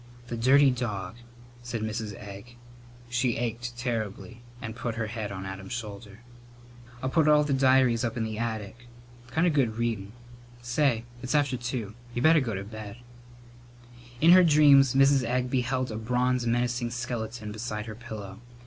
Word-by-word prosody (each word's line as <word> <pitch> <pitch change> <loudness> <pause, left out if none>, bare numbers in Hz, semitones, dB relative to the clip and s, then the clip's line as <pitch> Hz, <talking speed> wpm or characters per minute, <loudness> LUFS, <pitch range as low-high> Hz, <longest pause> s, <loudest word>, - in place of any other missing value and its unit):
"The 120 - -3
dirty 135 +4 +5
dog!" 115 -4 -4 0.4
said 120 -2 -4
Mrs. 110 -1 -4
Egg. 100 +4 -10 0.5
She 120 0 0
ached 120 +1 -4
terribly 115 -1 -4 0.2
and 115 -1 -6
put 120 -1 -4
her 115 -1 -2
head 110 -2 -5
on 95 -1 -6
Adam's 95 +3 -7
shoulder. 105 -2 -7 0.8
"I'll 130 - 0
put 160 0 +3
all 150 0 +6
the 145 -1 -1
diaries 130 -3 +4
up 115 -1 -2
in 115 - 0
the 110 -1 -4
attic. 115 +1 -5 0.4
Kind 160 +8 +1
of 170 - +2
good 120 -6 +1
readin.' 110 -4 -2 0.5
Say, 120 -1 +1 0.2
it's 130 +3 -2
after 140 -3 +2
two. 120 -4 -4 0.2
You 120 - -1
better 160 +1 +6
go 120 -7 -2
to 95 - -4
bed." 110 +1 -9 1.2
In 165 +5 +6
her 185 +1 +8
dreams 145 -5 +6
Mrs. 135 -1 +5
Egg 125 +1 -1
beheld 130 -1 0
a 110 - -4
bronze 125 +2 0
menacing 120 0 0
skeleton 115 -2 -4
beside 105 -1 -4
her 115 - -6
pillow. 105 -4 -8
120 Hz, 165 wpm, -27 LUFS, 110-130 Hz, 1.2 s, her